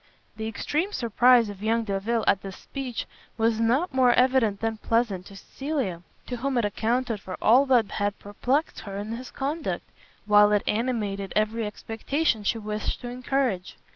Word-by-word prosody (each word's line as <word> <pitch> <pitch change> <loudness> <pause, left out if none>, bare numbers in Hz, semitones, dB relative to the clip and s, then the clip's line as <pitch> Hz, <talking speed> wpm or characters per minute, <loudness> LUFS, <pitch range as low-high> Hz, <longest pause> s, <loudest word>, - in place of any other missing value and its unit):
The 220 0 -4
extreme 310 - -2
surprise 240 0 +4
of 200 -1 -8
young 225 +2 +1
Delvile 215 +2 -1
at 195 - +3
this 195 -1 -8
speech 265 -4 -5 0.3
was 225 0 +2
not 260 +9 +1
more 255 -2 +5
evident 250 -5 +3
than 225 -1 -1
pleasant 215 -5 0
to 200 - -12
Cecilia, 260 - -3 0.2
to 245 - -4
whom 265 +2 -1
it 235 - +2
accounted 230 +2 0
for 185 -1 -7
all 255 +6 +5
that 240 -5 +3
had 205 0 -1
perplext 255 +9 -1
her 195 -2 -7
in 205 +2 -5
his 245 +2 -6
conduct, 295 +4 -3 0.4
while 210 0 +6
it 205 - +2
animated 210 -4 -1
every 215 +1 +1
expectation 225 +3 -1
she 215 - +1
wished 215 -1 -3
to 245 - -5
encourage. 250 -6 -1
225 Hz, 170 wpm, -26 LUFS, 205-255 Hz, 0.4 s, while